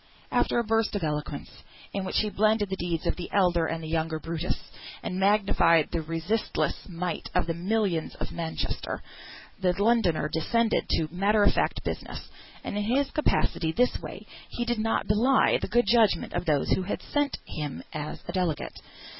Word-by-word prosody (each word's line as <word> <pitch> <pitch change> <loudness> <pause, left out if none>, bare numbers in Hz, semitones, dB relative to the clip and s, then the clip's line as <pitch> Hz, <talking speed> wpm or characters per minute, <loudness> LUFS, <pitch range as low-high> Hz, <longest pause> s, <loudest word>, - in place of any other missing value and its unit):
After - - +2
a 235 - +3
burst 225 -1 +1
of 200 - -1
eloquence, 150 -2 -4 0.3
in 195 - -1
which 190 - -1
he 210 -1 -2
blended 215 -1 +2
the - - +1
deeds 170 -3 -2
of - - 0
the 175 - -5
elder 175 -4 +3
and 165 0 -3
the - - -5
younger 160 0 -1
Brutus, 165 +2 -4 0.3
and 185 - -3
magnified 195 -5 +4
the 170 - -1
resistless 165 +8 -2
might 175 -1 -3
of - - +3
the 165 - -1
"millions 185 -1 0
of - - -5
Manchester," 165 -1 -3 0.6
the 180 -1 +1
Londoner 205 -8 +3
descended 225 +9 +1
to 160 - +1
matter 205 +4 +3
of - - +5
fact - - 0
business, - - -5 0.3
and - - -4
in 210 - 0
his 270 +6 +1
capacity 175 - +1
this 245 +8 +2
way - - -8 0.2
he 240 - -3
did 240 -2 0
not 225 +1 +1
belie 235 +6 +4
the - - -2
good 240 0 +3
judgment 220 -5 +3
of - - -2
those 150 -4 +1
who - - +3
had 185 - -3
sent 290 -1 0
him 150 -3 -5
as 150 0 -5
delegate. 180 -5 -1
185 Hz, 180 wpm, -27 LUFS, 165-220 Hz, 0.6 s, of